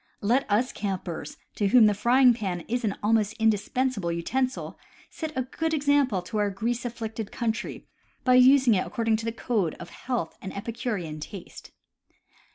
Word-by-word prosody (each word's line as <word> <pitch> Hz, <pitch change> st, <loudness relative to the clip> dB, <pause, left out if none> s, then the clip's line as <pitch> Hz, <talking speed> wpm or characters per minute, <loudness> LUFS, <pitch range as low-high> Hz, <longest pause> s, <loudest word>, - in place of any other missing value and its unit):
Let 240 Hz, +6 st, +1 dB
us 225 Hz, +5 st, +2 dB
campers, 180 Hz, -6 st, -5 dB, 0.2 s
to 205 Hz, -, 0 dB
whom 230 Hz, +2 st, +7 dB
the 210 Hz, -, +4 dB
frying 245 Hz, +5 st, +5 dB
pan 190 Hz, -6 st, -3 dB
is 240 Hz, +7 st, -3 dB
an 205 Hz, -3 st, 0 dB
almost 215 Hz, -1 st, +2 dB
indispensable 220 Hz, -2 st, 0 dB
utensil, 255 Hz, +10 st, -2 dB, 0.3 s
set 315 Hz, -2 st, -5 dB
a 260 Hz, -, +1 dB
good 320 Hz, +5 st, -2 dB
example 280 Hz, -, +2 dB
to 210 Hz, +4 st, -3 dB
our 205 Hz, -1 st, +2 dB
grease 230 Hz, +5 st, -2 dB
afflicted 225 Hz, -2 st, -5 dB
country 225 Hz, -2 st, -3 dB, 0.4 s
by 255 Hz, -, +4 dB
using 255 Hz, -1 st, +6 dB
it 185 Hz, -, 0 dB
according 225 Hz, -1 st, 0 dB
to 225 Hz, -, -6 dB
the 230 Hz, -, -1 dB
code 220 Hz, -7 st, -1 dB
of -, -, -10 dB
health 245 Hz, -10 st, -4 dB
and 190 Hz, +1 st, -7 dB
epicurean 205 Hz, -8 st, -4 dB
taste. 175 Hz, +4 st, -9 dB
225 Hz, 165 wpm, -26 LUFS, 200-250 Hz, 0.4 s, whom